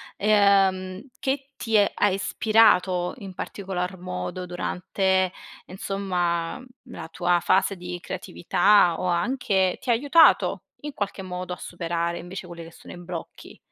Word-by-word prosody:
ehm, 195 Hz, 0 st, +2 dB
che 275 Hz, +1 st, -2 dB
ti 225 Hz, -3 st, +1 dB
ha 205 Hz, 0 st, +3 dB
ispirato 190 Hz, -3 st, +2 dB
in 195 Hz, -5 st, -9 dB
particolar 190 Hz, -1 st, -5 dB
modo 175 Hz, -, -5 dB
durante, 185 Hz, +1 st, -1 dB, 0.3 s
insomma, 180 Hz, -3 st, -2 dB, 0.2 s
la 160 Hz, -1 st, -9 dB
tua 175 Hz, +1 st, +1 dB
fase 195 Hz, +1 st, +2 dB
di 180 Hz, -1 st, -7 dB
creatività 180 Hz, -1 st, +2 dB
o 185 Hz, -, -2 dB
anche 190 Hz, 0 st, +1 dB
ti 260 Hz, -, -7 dB
ha -, -, +6 dB
aiutato, 285 Hz, +7 st, +4 dB, 0.2 s
in 295 Hz, 0 st, -6 dB
qualche 205 Hz, -5 st, -4 dB
modo, 180 Hz, -1 st, -6 dB
a 180 Hz, -, -4 dB
superare, 170 Hz, 0 st, -3 dB
invece, 180 Hz, +1 st, -8 dB
quelle 170 Hz, -1 st, -9 dB
che 165 Hz, -, -12 dB
sono -, -, -13 dB
i -, -, -10 dB
blocchi? 175 Hz, -1 st, -9 dB
185 Hz, 135 wpm, -24 LUFS, 175-200 Hz, 0.3 s, ha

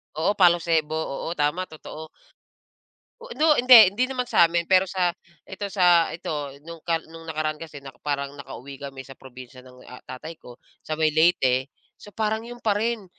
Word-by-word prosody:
oo, 160 Hz, +6 st, +1 dB
palosebo, 170 Hz, -4 st, +3 dB
oo 160 Hz, -1 st, -4 dB
tama, 160 Hz, +5 st, -1 dB
totoo. 155 Hz, 0 st, -10 dB, 1.1 s
O -, -, -11 dB
'no 310 Hz, 0 st, +5 dB
hindi, 240 Hz, -6 st, +8 dB
hindi 250 Hz, +5 st, +1 dB
naman 255 Hz, -1 st, -2 dB
sa'min, 170 Hz, -5 st, +3 dB
pero 185 Hz, +1 st, +3 dB
sa 180 Hz, -2 st, 0 dB, 0.3 s
ito, 200 Hz, +1 st, -6 dB
sa 175 Hz, -4 st, +4 dB
ito 145 Hz, -4 st, -5 dB
nung 165 Hz, -1 st, -10 dB
ka 165 Hz, 0 st, 0 dB
nung 165 Hz, 0 st, -12 dB
nakaraan 155 Hz, 0 st, -3 dB
kasi 160 Hz, -3 st, -9 dB
naka 135 Hz, -3 st, -13 dB
parang 140 Hz, -1 st, -3 dB
nakauwi 140 Hz, -1 st, -10 dB
kami 135 Hz, -1 st, -8 dB
sa 135 Hz, -, -11 dB
probinsiya 130 Hz, -1 st, -13 dB
ng, 125 Hz, 0 st, -17 dB
ah, 125 Hz, -, -12 dB
tatay 155 Hz, +6 st, -8 dB
ko, 120 Hz, 0 st, -14 dB, 0.2 s
sa 155 Hz, -, -5 dB
may 155 Hz, -1 st, +1 dB
Leyte. 135 Hz, -5 st, +2 dB, 0.3 s
So, -, -, -12 dB
parang 220 Hz, +1 st, -2 dB
'yon 240 Hz, +1 st, -10 dB
pa 215 Hz, -3 st, +1 dB
rin. 220 Hz, 0 st, -2 dB
165 Hz, 175 wpm, -24 LUFS, 140-190 Hz, 1.1 s, hindi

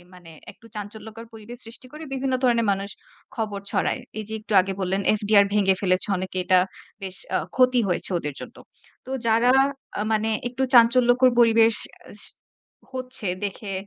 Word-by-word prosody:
মানে 175 Hz, -2 st, -15 dB, 0.2 s
একটু 230 Hz, -, -20 dB
চাঞ্চল্যকর 215 Hz, +2 st, -9 dB
পরিবেশ 225 Hz, +2 st, -11 dB
সৃষ্টি 230 Hz, +3 st, -11 dB
করে 310 Hz, +1 st, -9 dB
বিভিন্ন 265 Hz, 0 st, -1 dB
ধরনের 235 Hz, -3 st, +2 dB
মানুষ 195 Hz, +1 st, -4 dB, 0.5 s
খবর 210 Hz, -3 st, -3 dB
ছড়ায়। -, -, -1 dB, 0.2 s
এই 215 Hz, -, -4 dB
যে -, -, -5 dB
একটু 215 Hz, -, -8 dB
আগে 195 Hz, +1 st, -2 dB
বললেন, 190 Hz, +1 st, -1 dB, 0.2 s
FDR 205 Hz, -1 st, +4 dB
ভেঙে 195 Hz, -2 st, +3 dB
ফেলেছে 185 Hz, 0 st, +2 dB
অনেকে 185 Hz, 0 st, -6 dB
এটা 185 Hz, 0 st, +4 dB, 0.4 s
বেশ 190 Hz, -1 st, -5 dB, 0.2 s
আ -, -, +2 dB, 0.2 s
ক্ষতি 255 Hz, -1 st, +4 dB
হয়েছে 180 Hz, -, -1 dB
ওদের 150 Hz, -3 st, -5 dB
জন্য। -, -, -10 dB, 0.5 s
তো -, -, -9 dB, 0.2 s
যারা 230 Hz, +2 st, +3 dB, 0.5 s
আ -, -, -1 dB
মানে 220 Hz, +1 st, 0 dB, 0.2 s
একটু 250 Hz, +2 st, -4 dB
চাঞ্চল্যকর 245 Hz, +2 st, +5 dB
পরিবেশ 225 Hz, -1 st, +5 dB, 0.4 s
আস -, -, -9 dB, 0.7 s
হচ্ছে 255 Hz, -6 st, -5 dB, 0.2 s
দেখে 200 Hz, 0 st, -5 dB
220 Hz, 160 wpm, -23 LUFS, 195-240 Hz, 0.7 s, চাঞ্চল্যকর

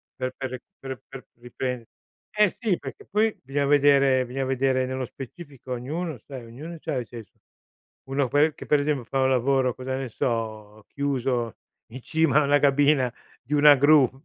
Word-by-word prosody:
per 130 Hz, 0 st, -3 dB
per 130 Hz, -1 st, -4 dB
re 130 Hz, -, -6 dB, 0.2 s
per 130 Hz, -4 st, -7 dB
per 135 Hz, -2 st, -10 dB
riprende 125 Hz, 0 st, -5 dB, 0.4 s
eh 210 Hz, -1 st, +4 dB
sì, 210 Hz, -5 st, -1 dB
perché 135 Hz, -2 st, -9 dB
poi 215 Hz, +1 st, +1 dB
bisogna 140 Hz, +2 st, -1 dB
vedere, 140 Hz, -2 st, +4 dB
bisogna 130 Hz, +2 st, -3 dB
vedere 130 Hz, 0 st, +1 dB
nello 130 Hz, 0 st, -3 dB
specifico 135 Hz, 0 st, -9 dB
ognuno, 150 Hz, +5 st, -4 dB
sai, 130 Hz, 0 st, -10 dB
ognuno 155 Hz, +9 st, -9 dB
c'ha -, -, -3 dB
i 120 Hz, -, -5 dB
se 115 Hz, 0 st, -9 dB
so -, -, -41 dB, 0.7 s
uno 135 Hz, -1 st, +1 dB
poi 150 Hz, +3 st, +3 dB
che -, -, -9 dB
per 150 Hz, -, +3 dB
esempio 145 Hz, -3 st, -1 dB
fa 135 Hz, +2 st, -1 dB
un 130 Hz, -, +3 dB
lavoro, 130 Hz, 0 st, +2 dB
cosa 130 Hz, +1 st, -4 dB
ne 135 Hz, -1 st, -3 dB
so, 110 Hz, -3 st, -3 dB
chiuso 130 Hz, -4 st, -1 dB, 0.3 s
in 130 Hz, +1 st, -8 dB
cima 160 Hz, 0 st, +2 dB
a -, -, +2 dB
una 145 Hz, +1 st, +3 dB
cabina 140 Hz, -3 st, +3 dB, 0.3 s
di 140 Hz, +5 st, -5 dB
una 145 Hz, 0 st, +8 dB
gru 145 Hz, -1 st, +5 dB
135 Hz, 180 wpm, -25 LUFS, 125-145 Hz, 0.7 s, una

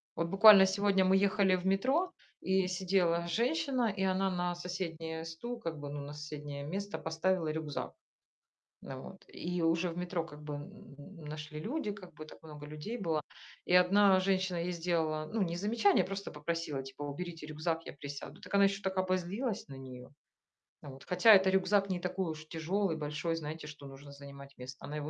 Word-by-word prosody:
Вот 170 Hz, 0 st, -1 dB
буквально 195 Hz, 0 st, +9 dB
сегодня 195 Hz, 0 st, +2 dB
мы 190 Hz, +1 st, +4 dB
ехали 195 Hz, -1 st, +3 dB
в 180 Hz, 0 st, -5 dB
метро- 265 Hz, -, +2 dB, 0.3 s
и 190 Hz, -1 st, +2 dB
сидела 180 Hz, -2 st, +1 dB
женщина- 250 Hz, -, +1 dB
и 190 Hz, -, -1 dB
она 190 Hz, 0 st, +2 dB
на 175 Hz, -1 st, -1 dB
соседнее 165 Hz, -2 st, -5 dB
стул, 235 Hz, +10 st, -6 dB
как 165 Hz, -6 st, -5 dB
бы, 145 Hz, 0 st, -6 dB
ну, 145 Hz, 0 st, -5 dB
на 145 Hz, +1 st, -7 dB
соседнее 145 Hz, -1 st, -6 dB
место 200 Hz, +6 st, -4 dB
поставила 165 Hz, +1 st, 0 dB
рюкзак. 155 Hz, -2 st, -4 dB, 0.9 s
Э, 135 Hz, -, -6 dB
вот. 190 Hz, +8 st, -10 dB
И 175 Hz, 0 st, -3 dB
уже 165 Hz, +2 st, +2 dB
в 165 Hz, -, -8 dB
метро 180 Hz, -2 st, -2 dB
как 150 Hz, -2 st, -12 dB
бы 150 Hz, -1 st, -5 dB
н 155 Hz, 0 st, -11 dB
нашли 150 Hz, 0 st, -6 dB
люди, 240 Hz, -, -2 dB
как 180 Hz, -5 st, -12 dB
бы 155 Hz, -, -9 dB
так -, -, -14 dB
много 150 Hz, -2 st, -10 dB
людей 155 Hz, +11 st, -6 dB
было. 165 Hz, -6 st, 0 dB, 0.5 s
И 180 Hz, -, +2 dB
одна 190 Hz, +1 st, +6 dB
женщина 190 Hz, -1 st, +1 dB
ей 175 Hz, +1 st, -2 dB
сделала, 165 Hz, -3 st, -1 dB
ну, 225 Hz, -3 st, +1 dB
не 170 Hz, -1 st, -1 dB
замечание, 205 Hz, -1 st, +3 dB
просто 195 Hz, +1 st, -5 dB
попросила 150 Hz, -2 st, -3 dB
типа: 135 Hz, +2 st, -10 dB
"Уберите 160 Hz, +2 st, -5 dB
рюкзак, 160 Hz, +2 st, -2 dB
я -, -, -6 dB
присяду". 145 Hz, 0 st, -8 dB
Так -, -, -9 dB
она 200 Hz, 0 st, +6 dB
ещё 195 Hz, +1 st, +1 dB
так 190 Hz, 0 st, -2 dB
обозлилась 185 Hz, -, -1 dB
на 135 Hz, -, -9 dB
неё, 125 Hz, -1 st, -10 dB, 0.7 s
вот. 135 Hz, -1 st, -10 dB
Хотя 180 Hz, +5 st, +7 dB
это 190 Hz, -1 st, +6 dB
рюкзак 195 Hz, +1 st, +2 dB
не 180 Hz, -1 st, -1 dB
такой 180 Hz, -1 st, -2 dB
уж 155 Hz, 0 st, -9 dB
тяжёлый, 165 Hz, +2 st, -1 dB
большой, 155 Hz, +2 st, -2 dB
знаете, 155 Hz, 0 st, -6 dB
что 150 Hz, -2 st, -10 dB
нужно 140 Hz, +1 st, -11 dB
занимать 140 Hz, -1 st, -11 dB
место. 125 Hz, +1 st, -9 dB
Она 150 Hz, +1 st, -5 dB
его 150 Hz, 0 st, -4 dB
175 Hz, 185 wpm, -32 LUFS, 150-195 Hz, 0.9 s, буквально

